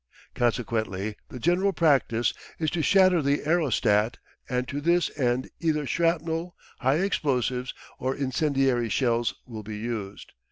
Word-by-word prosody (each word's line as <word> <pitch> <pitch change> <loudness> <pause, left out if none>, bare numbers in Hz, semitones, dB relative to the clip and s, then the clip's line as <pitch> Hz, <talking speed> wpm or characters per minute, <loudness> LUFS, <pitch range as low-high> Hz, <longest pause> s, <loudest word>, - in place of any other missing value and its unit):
Consequently 110 -4 -1
the - - -8
general 180 +8 +2
practice 135 -8 +2 0.2
is 155 -2 -1
to 170 - -1
shatter 185 0 +5
the 140 +1 0
aerostat, 120 -9 +2 0.3
and 125 0 -1
to 145 +1 -4
this 170 +2 +2
end 125 -2 0
either 155 -3 0
shrapnel, 165 +2 0 0.2
high 135 +1 +2
explosive, 130 - 0 0.3
or 130 +1 -1
incendiary 135 -3 +1
shells 115 -5 +1
will 115 -3 -7
be 105 0 -7
used. 105 -3 -5
130 Hz, 130 wpm, -26 LUFS, 120-160 Hz, 0.3 s, shatter